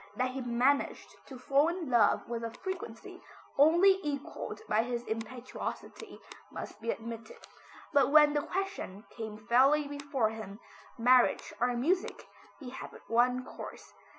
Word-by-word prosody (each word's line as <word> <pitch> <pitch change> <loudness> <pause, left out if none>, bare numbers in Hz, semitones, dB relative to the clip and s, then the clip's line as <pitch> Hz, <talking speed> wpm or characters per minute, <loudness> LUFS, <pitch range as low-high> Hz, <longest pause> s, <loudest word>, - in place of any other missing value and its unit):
That 255 0 0
he 265 +1 -5
managed 245 +3 0
to 265 - -9
fall 275 +4 +3
in 340 -1 -3
love 235 -5 +3
with 235 -1 -4
a 230 - -2
frequency 365 - -7 0.3
only 345 +7 +6
equalled 285 -4 -5
by 215 - +3
his 240 0 -3
impetuosity, 225 +2 -6 0.3
must 210 - -8
be 230 - -4
admitted. 230 - -5 0.6
But 280 -1 +4
when 300 -1 +7
the 295 - +1
question 365 - -4
came 220 -2 -7
fairly 275 +6 +4
before 285 -5 -1
him, 215 -2 -8 0.4
marriage 250 +1 +4
or 245 - +4
music, 345 +10 -1 0.3
he 260 -4 -8
had 265 - -7
but - - -16
one 250 +2 +3
course. - - -10
255 Hz, 145 wpm, -31 LUFS, 230-295 Hz, 0.6 s, when